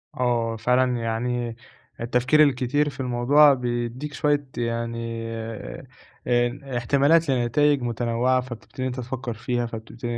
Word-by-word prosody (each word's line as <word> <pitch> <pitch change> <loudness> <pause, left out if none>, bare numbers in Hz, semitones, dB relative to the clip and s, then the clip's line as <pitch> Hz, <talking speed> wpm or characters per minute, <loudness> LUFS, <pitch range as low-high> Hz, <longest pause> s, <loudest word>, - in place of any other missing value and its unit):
آه 120 -2 0
فعلًا، 125 +2 +2
يعني 115 +1 -2 0.5
التفكير 125 +5 +3
الكتير 140 +1 +1
في 135 -1 -13
الموضوع 135 +4 +5
بيدّيك 120 +3 -3
شوية 145 -1 0
يعني 115 -1 -3 1.0
آآ 120 +2 0
احتمالات 140 +6 +3
لنتايج 135 +3 +2
متنوعة، 120 +2 0
فبتبتدي 125 +1 -9
إن - - 0
أنت 130 0 -5
تفكّر 125 0 -4
فيها، 120 +2 -2
فبتبتدي 115 +1 -7
125 Hz, 120 wpm, -24 LUFS, 115-135 Hz, 1.0 s, الموضوع